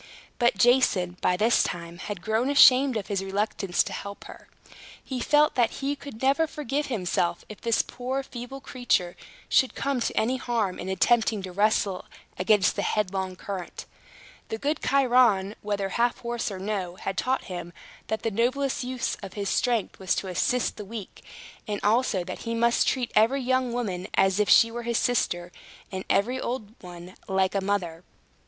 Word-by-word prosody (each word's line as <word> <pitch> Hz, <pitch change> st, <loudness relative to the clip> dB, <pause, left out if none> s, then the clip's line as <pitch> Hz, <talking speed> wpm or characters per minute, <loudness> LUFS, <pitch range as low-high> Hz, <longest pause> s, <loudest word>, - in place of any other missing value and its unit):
But 240 Hz, -4 st, +3 dB
Jason, 190 Hz, -6 st, +3 dB
by 180 Hz, -, +2 dB
this 225 Hz, +5 st, +4 dB
time, 170 Hz, 0 st, -4 dB
had 200 Hz, -2 st, -6 dB
grown 220 Hz, +4 st, 0 dB
ashamed 265 Hz, -2 st, +6 dB
of 205 Hz, -, -4 dB
his 195 Hz, -2 st, -2 dB
reluctance 195 Hz, -1 st, 0 dB
to -, -, -6 dB
help 200 Hz, 0 st, -7 dB
her. -, -, -12 dB, 0.6 s
He 260 Hz, -2 st, -4 dB
felt 300 Hz, +4 st, +3 dB
that 240 Hz, -2 st, +2 dB
he 280 Hz, +1 st, -2 dB
could 275 Hz, -4 st, -10 dB
never 280 Hz, +5 st, +3 dB
forgive 295 Hz, -1 st, -3 dB
himself, 180 Hz, -7 st, -1 dB
if 215 Hz, -, -10 dB
this 230 Hz, -1 st, +2 dB
poor 260 Hz, +2 st, -4 dB
feeble 255 Hz, +1 st, -8 dB
creature 230 Hz, -10 st, 0 dB, 0.3 s
should 260 Hz, -, +3 dB
come 275 Hz, -2 st, -1 dB
to 235 Hz, -, -2 dB
any 250 Hz, +4 st, 0 dB
harm 230 Hz, -7 st, -1 dB
in -, -, -5 dB
attempting 220 Hz, +2 st, +2 dB
to 185 Hz, -, -6 dB
wrestle 200 Hz, -1 st, +1 dB, 0.3 s
against 190 Hz, 0 st, +3 dB
the -, -, -1 dB
headlong 190 Hz, -2 st, -1 dB
current. 185 Hz, -1 st, -6 dB, 0.6 s
The 220 Hz, -, -3 dB
good 290 Hz, +6 st, -1 dB
Chiron, 245 Hz, -7 st, +3 dB
whether 200 Hz, -2 st, -2 dB
half 235 Hz, +4 st, +1 dB
horse 235 Hz, -1 st, -2 dB
or 195 Hz, -, -6 dB
no, 190 Hz, -2 st, -3 dB
had 195 Hz, +1 st, -4 dB
taught 260 Hz, +5 st, 0 dB
him 175 Hz, -2 st, -7 dB, 0.4 s
that 220 Hz, -, -3 dB
the 225 Hz, -, 0 dB
noblest 255 Hz, +6 st, 0 dB
use 250 Hz, 0 st, -2 dB
of 195 Hz, -3 st, -8 dB
his 200 Hz, -2 st, -3 dB
strength 240 Hz, -5 st, 0 dB
was 190 Hz, -2 st, 0 dB
to 190 Hz, -, -3 dB
assist 245 Hz, +7 st, 0 dB
the 210 Hz, -, -6 dB
weak; 205 Hz, -1 st, -9 dB, 0.4 s
and 205 Hz, -1 st, -2 dB
also 215 Hz, -3 st, +2 dB
that 185 Hz, +1 st, -7 dB
he 230 Hz, 0 st, -3 dB
must 235 Hz, +1 st, +2 dB
treat 250 Hz, -3 st, 0 dB
every 250 Hz, +6 st, +4 dB
young 255 Hz, 0 st, +1 dB
woman 195 Hz, -7 st, -3 dB
as 195 Hz, +1 st, +3 dB
if 210 Hz, -, +2 dB
she 230 Hz, -, +6 dB
were 240 Hz, +1 st, -5 dB
his 235 Hz, -1 st, -1 dB
sister, 175 Hz, -7 st, 0 dB, 0.4 s
and 190 Hz, -1 st, -5 dB
every 245 Hz, +7 st, +1 dB
old 230 Hz, -4 st, -4 dB
one 175 Hz, 0 st, -10 dB
like 190 Hz, -1 st, +1 dB
a 200 Hz, -, 0 dB
mother. 185 Hz, -4 st, -2 dB
220 Hz, 180 wpm, -26 LUFS, 190-250 Hz, 0.6 s, ashamed